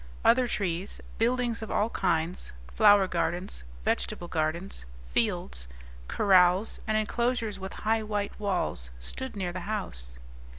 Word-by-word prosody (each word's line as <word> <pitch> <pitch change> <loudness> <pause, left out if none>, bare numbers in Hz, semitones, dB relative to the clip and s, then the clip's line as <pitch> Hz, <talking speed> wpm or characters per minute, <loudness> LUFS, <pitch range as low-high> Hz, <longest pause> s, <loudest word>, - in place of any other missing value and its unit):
Other 250 +1 +5
trees, 185 -3 -2 0.2
buildings 240 0 +1
of 220 - -5
all 220 +3 +1
kinds, 170 -1 0 0.2
flower 200 - +7
gardens, 175 - -2 0.2
vegetable 65 - -1
gardens, 165 - -2 0.3
fields, 60 0 0 0.4
corrals, 185 0 +4
and 215 0 +2
enclosures 225 -1 0
with 190 +1 -6
high 220 +1 +3
white 210 -1 -3
walls 180 - -1
stood 260 - -5
near 180 -3 -2
the 185 - -3
house. 60 - -3
195 Hz, 125 wpm, -29 LUFS, 170-215 Hz, 0.4 s, flower